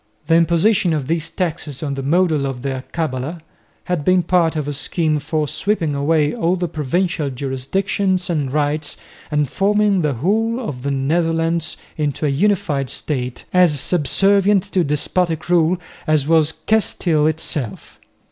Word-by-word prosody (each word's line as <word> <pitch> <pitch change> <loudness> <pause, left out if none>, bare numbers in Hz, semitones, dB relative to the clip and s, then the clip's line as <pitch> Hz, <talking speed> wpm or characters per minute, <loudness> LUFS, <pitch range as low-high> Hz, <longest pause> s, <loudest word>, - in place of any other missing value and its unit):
The 165 - +1
imposition 170 +2 +3
of 150 -4 -1
these 165 +2 -1
taxes 160 -6 -3
on 140 -2 -2
the 135 - -4
model 155 -1 +2
of 130 -2 -5
the 135 -1 -1
alcabala 135 +2 -4 0.4
had 180 -5 -2
been 185 +2 +3
part 170 -3 +2
of 150 -2 -2
a 145 - -2
scheme 155 +2 0
for 150 +1 -1
sweeping 160 0 -1
away 150 +1 +1
all 185 -6 +1
the 175 -1 -2
provincial 160 +1 -1
jurisdictions 180 +9 -1
and 150 -6 -1
rights 150 +1 -1 0.3
and 150 -1 +1
forming 205 +2 +2
the 150 -3 0
whole 220 - 0
of 150 - -5
the 140 - -2
Netherlands 165 +4 0 0.2
into 150 0 -1
a - - +2
unified 145 -4 +1
state, 125 -4 -3
as 175 -6 +4
subservient 195 +6 +3
to 185 - +3
despotic 160 +3 -1
rule 175 0 +3 0.3
as 155 -2 +2
was 160 -1 +4
Castile 170 -8 +2
itself. 155 -6 -4
160 Hz, 150 wpm, -19 LUFS, 145-180 Hz, 0.4 s, as